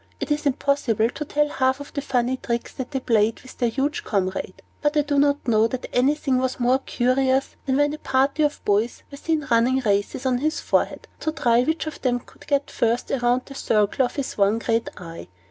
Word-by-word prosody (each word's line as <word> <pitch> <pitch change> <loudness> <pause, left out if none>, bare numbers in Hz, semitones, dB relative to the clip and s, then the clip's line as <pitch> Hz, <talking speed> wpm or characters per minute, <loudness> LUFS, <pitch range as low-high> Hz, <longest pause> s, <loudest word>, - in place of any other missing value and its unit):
It - - -4
is 295 0 +1
impossible 255 -5 +1
to 300 - -5
tell 295 +1 +1
half 260 -2 +1
of 285 - -10
the 280 - -2
funny 260 -2 0
tricks 235 -2 -3
that 260 - -5
they 270 - -2
played 225 -2 +2
with 260 - -14
their 240 -2 +2
huge 275 +5 -1
comrade; 190 -2 -2 0.2
but 295 +1 +1
I 295 - +4
do 285 -1 +1
not 285 -1 +2
know 220 -1 +4
that 255 +2 -5
anything 265 +1 +2
was 260 0 -2
more 250 +2 +3
curious 260 +1 +1
than 265 0 +2
when 290 0 +2
a 305 - -6
party 270 +3 +1
of 295 -1 0
boys 210 +3 +1
were 280 - -8
seen 310 0 -1
running 235 +3 +4
races 205 +3 0
on 255 -1 +2
his 310 +4 0
forehead, - - 0
to 315 - -1
try 240 -6 +3
which 315 +6 -1
of 310 - -7
them 245 -2 +1
could - - -19
get 285 -1 0
first 235 +1 0
round 245 +1 +2
the 275 - -10
circle 215 -1 +1
of 245 - -2
his 275 -6 -4
one 200 +2 +4
great 230 0 0
eye. 165 -2 -9
260 Hz, 215 wpm, -23 LUFS, 235-285 Hz, 0.2 s, I